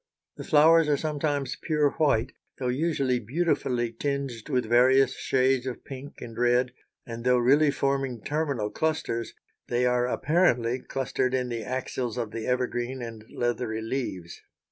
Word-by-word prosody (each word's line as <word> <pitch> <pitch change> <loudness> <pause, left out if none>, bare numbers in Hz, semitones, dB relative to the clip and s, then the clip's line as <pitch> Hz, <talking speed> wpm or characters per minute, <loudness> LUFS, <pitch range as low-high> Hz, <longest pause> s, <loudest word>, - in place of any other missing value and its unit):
The - - -6
flowers 160 +1 +5
are 145 - +3
sometimes 145 -3 -2
pure 150 -3 +2
white 135 -5 +1 0.3
though 125 -2 -2
usually 135 -2 0
beautifully 125 -2 0
tinged 135 -1 -3
with 125 -4 +1
various 130 +4 +4
shades 130 0 +1
of 125 - -6
pink 135 +1 -9
and 115 -1 -8
red, 120 +1 +2 0.3
and 115 0 -7
though 125 0 +4
really 140 +5 +4
forming 135 -4 -1
terminal 140 -9 -1
clusters, 155 -7 -2 0.3
they 120 +1 +1
are 125 0 +2
apparently 125 -5 +2
clustered 130 -1 -1
in 125 -1 -1
the 115 -1 -3
axils 125 -2 -3
of 115 -3 -3
the 115 -1 -5
evergreen 125 0 -1
and 115 -2 -8
leathery 120 -2 -2
leaves. 105 -8 -4
125 Hz, 145 wpm, -27 LUFS, 120-140 Hz, 0.3 s, flowers